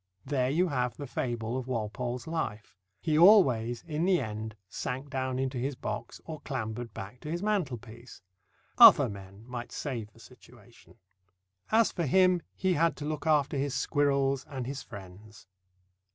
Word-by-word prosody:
There 130 Hz, -2 st, 0 dB
you 175 Hz, +6 st, +2 dB
have 125 Hz, -4 st, -1 dB
the 145 Hz, -, -5 dB
fable 120 Hz, -2 st, -3 dB
of 130 Hz, -, -7 dB
Walpole's 120 Hz, +1 st, -3 dB
life. 115 Hz, -12 st, -4 dB, 0.3 s
He 155 Hz, -2 st, 0 dB
always 130 Hz, -, +5 dB
in 160 Hz, 0 st, -2 dB
the 185 Hz, -1 st, +3 dB
end 110 Hz, -2 st, -5 dB
sank 130 Hz, +8 st, -5 dB
down 130 Hz, -1 st, -2 dB
into 130 Hz, -1 st, -2 dB
his 135 Hz, +3 st, -2 dB
box -, -, -5 dB
or 155 Hz, -2 st, -7 dB
clambered 115 Hz, -3 st, -4 dB
back 100 Hz, +5 st, -8 dB
to 150 Hz, -, -8 dB
his 170 Hz, +4 st, -3 dB
mantelpiece. 120 Hz, -, -3 dB, 0.6 s
Other -, -, +10 dB
men 100 Hz, +1 st, -11 dB
might 125 Hz, -1 st, -6 dB
save 115 Hz, -7 st, -5 dB
the -, -, -21 dB
situation. -, -, -18 dB, 0.8 s
As 225 Hz, 0 st, +4 dB
for 170 Hz, -4 st, -2 dB
him, 185 Hz, +3 st, +4 dB
he 190 Hz, -1 st, +1 dB
had 165 Hz, +1 st, +2 dB
to 145 Hz, -, -5 dB
look 155 Hz, +1 st, -3 dB
after 145 Hz, -2 st, +2 dB
his 140 Hz, 0 st, -1 dB
squirrels 140 Hz, -2 st, +1 dB
and 130 Hz, -4 st, -4 dB
his 135 Hz, +1 st, -5 dB
friends. 100 Hz, +1 st, -12 dB
130 Hz, 160 wpm, -29 LUFS, 115-150 Hz, 0.8 s, Other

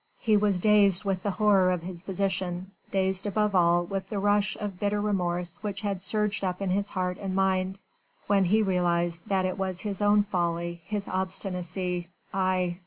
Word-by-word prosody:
He 220 Hz, -4 st, +2 dB
was 205 Hz, -3 st, +2 dB
dazed 205 Hz, -1 st, +4 dB
with 190 Hz, -2 st, 0 dB
the 205 Hz, -, -1 dB
horror 200 Hz, -2 st, +4 dB
of 180 Hz, -2 st, -2 dB
his 175 Hz, -1 st, -6 dB
position, 190 Hz, -1 st, -2 dB, 0.2 s
dazed 190 Hz, +1 st, 0 dB
above 210 Hz, 0 st, +1 dB
all 175 Hz, -1 st, +4 dB
with 195 Hz, +2 st, -4 dB
the 210 Hz, -, -3 dB
rush 205 Hz, 0 st, +2 dB
of 200 Hz, -4 st, -5 dB
bitter 205 Hz, 0 st, 0 dB
remorse 180 Hz, -4 st, -1 dB
which 205 Hz, -1 st, -4 dB
had 200 Hz, -3 st, -2 dB
surged 210 Hz, +1 st, -1 dB
up 180 Hz, -1 st, -1 dB
in 195 Hz, -2 st, -1 dB
his 200 Hz, +2 st, 0 dB
heart 180 Hz, 0 st, -2 dB
and 195 Hz, -2 st, -3 dB
mind, 190 Hz, 0 st, +1 dB, 0.5 s
when 200 Hz, -1 st, +3 dB
he 215 Hz, +5 st, +3 dB
realised 175 Hz, -3 st, +1 dB
that 190 Hz, -2 st, +1 dB
it 185 Hz, +2 st, -2 dB
was 190 Hz, -1 st, -2 dB
his 205 Hz, -2 st, -3 dB
own 205 Hz, 0 st, +5 dB
folly, 170 Hz, -3 st, -2 dB
his 205 Hz, -1 st, -3 dB
obstinacy 180 Hz, -1 st, -3 dB, 0.3 s
aye! 185 Hz, -2 st, 0 dB
190 Hz, 180 wpm, -27 LUFS, 180-205 Hz, 0.5 s, own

